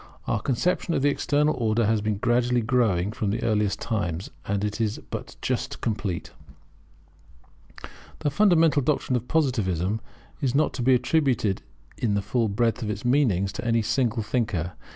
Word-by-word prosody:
[Our 110 - -1
conception 165 +7 0
of 135 - 0
this 145 - +4
External 150 +2 +1
Order 115 -1 +1
has 110 0 +2
been 105 -1 -1
gradually 120 +2 +2
growing 110 -6 +1
from 105 -2 -2
the 105 - -2
earliest 105 -3 +1
times, 90 -6 -3 0.2
and 100 0 -1 0.2
is 110 -2 -1
but - - -6
just - - -2
complete] 105 -6 -3 1.9
This 145 - -2
fundamental 165 -6 +4
doctrine 135 -1 0
of 125 0 -2
Positivism 110 - 0 0.4
is 135 -2 0
not 155 - +2
to 130 - -4
be 130 +1 +5
attributed 125 - +1 0.4
in 105 -4 +1
the 100 - 0
full 115 +2 0
breadth 115 +4 0
of 110 - -3
its 105 +4 -4
meanings 115 -8 +2
to 105 - -6
any 115 -1 +2
single 115 0 0
thinker. 105 -7 -1
115 Hz, 160 wpm, -25 LUFS, 105-130 Hz, 1.9 s, be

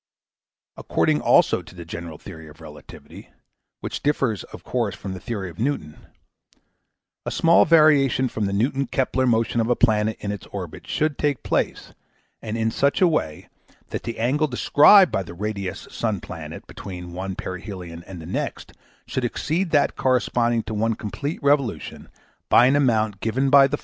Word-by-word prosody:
According - - +1
also - - +4
to - - -15
the 85 -1 -9
general 85 -1 -7
theory 80 -3 -11
of 75 - -15
relativity, - - -13 0.5
which - - -5
differs 130 - 0
of - - -12
course 115 -6 -2
from 95 -1 -6
the 95 - -7
theory 105 -5 -4
of 85 -1 -11
Newton, 110 - -3 1.2
a - - -3
small 170 0 +4
variation 145 -5 +4
from 110 -4 -2
the 100 - -3
Newton 130 +6 0
Kepler 130 +1 0
motion 115 0 +1
of 115 - -1
a 120 - +3
planet 110 -2 +2
in 100 - -4
its 105 -3 -7
orbit - - -8
should 155 -2 -1
take 145 -4 0
place, - - -2 0.5
and 110 0 -4
in 110 0 0
such 140 +5 +1
away, 155 - +1 0.4
that - - -3
the 115 0 -6
angle 135 +7 +1
described 150 +8 +6
by - - 0
the 85 -2 -9
radius 100 -2 -4
sun 110 -4 -2
planet 80 -3 -9
between 90 -2 -9
one 95 +1 -4
perhelion 90 -3 -7
and 95 -2 -8
the 80 - -9
next 85 - -4 0.3
should 130 - -3
exceed 165 +9 -1
that 150 -2 +2
corresponding 120 -2 +1
to 110 - -6
one 110 +1 0
complete 140 +9 -4
revolution 140 -4 0 0.4
by 120 - +6
an 130 +3 +4
amount 110 -7 +1
given 130 +6 0
by 140 -1 +8
eq. 145 +2 -3
115 Hz, 170 wpm, -23 LUFS, 95-135 Hz, 1.2 s, by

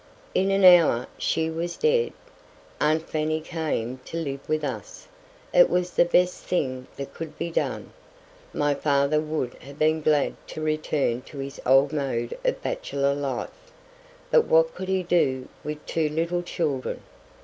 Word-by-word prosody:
In 190 +1 +2
an 195 0 +2
hour 170 -9 +7
she 160 0 0
was 170 +2 -3
dead. 465 0 +2 0.7
Aunt 155 +2 +1
Fanny 155 0 -1
came 155 -7 -3
to 165 - -6
live 140 -4 -3
with 155 0 0
us. 120 -8 -6 0.5
It 175 - +7
was 180 0 0
the 175 - +4
best 180 +1 +2
thing 130 -7 -2
that 140 - -7
could 165 -2 -7
be 170 0 -3
done. - - -2 0.6
My 145 0 +1
father 140 +1 +2
would 155 -5 -2
have 140 +2 -12
been 155 +1 +2
glad 150 -1 +2
to - - -7
return 155 -5 0
to 150 - -11
his 140 0 -6
old 135 +3 +5
mode 130 -5 -2
of - - -1
bachelor 140 0 -1
life, 140 - -5 0.6
but 475 -2 +5
what - - +4
could 190 - -6
he 190 -1 +1
do 135 -7 +1 0.2
with 150 0 -6
two 160 -2 0
little 170 +3 -1
children? 150 -6 -3
155 Hz, 160 wpm, -25 LUFS, 140-175 Hz, 0.7 s, hour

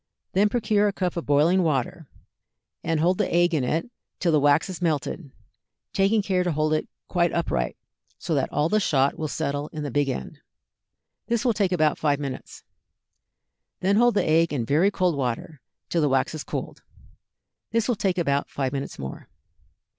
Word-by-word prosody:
Then 205 +3 +4
procure 215 -2 +2
a - - +1
cup 180 -3 -2
of 170 - -4
boiling 155 +6 +4
water, 160 +1 -1 0.8
and 165 -1 0
hold 180 +3 +2
the - - 0
egg 175 0 +3
in 150 -5 +1
it 165 - -1 0.3
till 175 - +2
the 155 - +4
wax 145 +2 +3
is 185 -2 -7
melted, 155 -1 -1 0.6
taking 200 +2 +2
care 185 -2 +1
to 180 - 0
hold 155 0 +1
it 155 - 0 0.2
quite 175 -2 +1
upright, 60 - -1 0.4
so - - -3
that - - 0
all 150 +2 +1
the 215 +5 +2
shot 140 -8 +1
will 155 - -1
settle 145 0 -2
in 155 -1 -6
the 145 - -4
big 145 +2 +1
end. 130 - -5 0.9
This 235 +1 0
will 240 - +3
take 200 -3 0
about 155 -4 +2
five 145 -2 +1
minutes. 135 -3 -7 1.2
Then 195 +2 +3
hold 240 0 +4
the - - +2
egg 165 +1 +3
in 130 -6 -1
very 155 - +3
cold 185 -5 +1
water 130 +3 -3 0.3
till 170 - 0
the 150 - +2
wax 135 0 +1
has 155 -2 -5
cooled. - - -5 0.9
This 230 -1 0
will 245 - +2
take 190 -2 0
about 140 -5 0
five 135 -1 -2
minutes 140 0 -4
more. 65 -1 -7
165 Hz, 185 wpm, -25 LUFS, 145-185 Hz, 1.2 s, Then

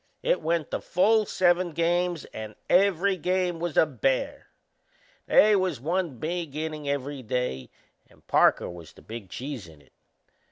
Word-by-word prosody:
It - - +1
went 165 -2 -1
the - - -2
full 215 +3 +2
seven 175 -1 +2
games 175 0 0
and 110 -1 -7 0.2
every 195 0 +3
game 180 0 0
was 170 -2 -3
a - - +7
bear. 135 -2 -1 0.8
They 215 0 +6
was 185 -8 0
one 165 0 -2
big 165 +1 -4
innin' 155 -1 -4
every 140 0 -3
day 120 - -3 0.4
and - - -24
Parker - - +3
was 85 -2 -10
the - - -18
big 110 -4 -8
cheese 130 - -6
in 80 -2 -16
it. 70 - -25
160 Hz, 155 wpm, -26 LUFS, 130-180 Hz, 0.8 s, a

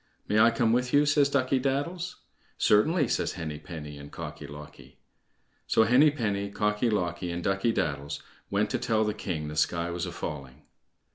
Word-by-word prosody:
"May 105 - +2
I 115 +2 +7
come 115 -1 +2
with 125 +1 0
you?" 145 +1 +5
says 145 -1 +3
Ducky 135 -1 +2
daddles. 165 +7 -2 0.4
"Certainly," 145 - +3
says - - 0
Henny 80 -5 -5
penny 75 -2 -8
and 70 0 -11
Cocky - - -7
locky. 75 +1 -12 0.7
So 110 - +4
Henny 125 +7 +6
penny, 100 -8 -2
Cocky 105 +3 0
locky, 90 -4 -1
and 85 0 -4
Ducky 95 +4 +1
daddles 70 -8 -2 0.3
went - - 0
to - - 0
tell 110 -1 +1
the 105 -1 0
king 85 -7 -4
the 75 - -6
sky 85 +3 0
was 85 0 -3
a - - -5
falling. 70 -4 -7
105 Hz, 180 wpm, -28 LUFS, 80-125 Hz, 0.7 s, I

